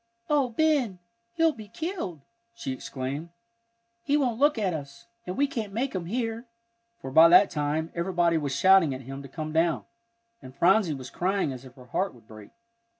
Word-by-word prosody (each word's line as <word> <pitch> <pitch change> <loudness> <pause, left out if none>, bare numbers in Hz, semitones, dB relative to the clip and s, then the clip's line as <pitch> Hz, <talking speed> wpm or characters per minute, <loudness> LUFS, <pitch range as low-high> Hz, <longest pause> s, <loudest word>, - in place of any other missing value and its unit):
"Oh, 285 -4 +3
Ben, 265 -6 +1 0.4
he'll 330 -1 +3
be 220 -7 -11
killed!" 320 - -5 0.3
she 230 -12 -5
exclaimed. 135 +5 -5 0.7
"He 285 +4 +1
won't 245 -5 0
look 290 -1 +4
at 195 -5 0
us, 140 +4 -8 0.2
and 180 - -4
we 285 - +4
can't 225 -7 -4
make 255 +5 -1
him 180 -3 -4
hear," 230 +2 -3 0.5
for 135 - -7
by 160 +4 +8
that 185 +3 +7
time 150 +2 -1
everybody 170 -1 +1
was 140 -3 -2
shouting 190 -7 +5
at 130 - -8
him 135 +2 -8
to 140 - -11
come 155 +2 -5
down, 165 0 +1 0.6
and 130 -1 -12
Phronsie 185 -3 +3
was 130 -1 -9
crying 185 -5 0
as 130 +1 -10
if 130 -1 -14
her 125 -2 -14
heart 180 +7 -2
would 115 -2 -20
break. 110 -1 -12
175 Hz, 185 wpm, -27 LUFS, 140-230 Hz, 0.7 s, by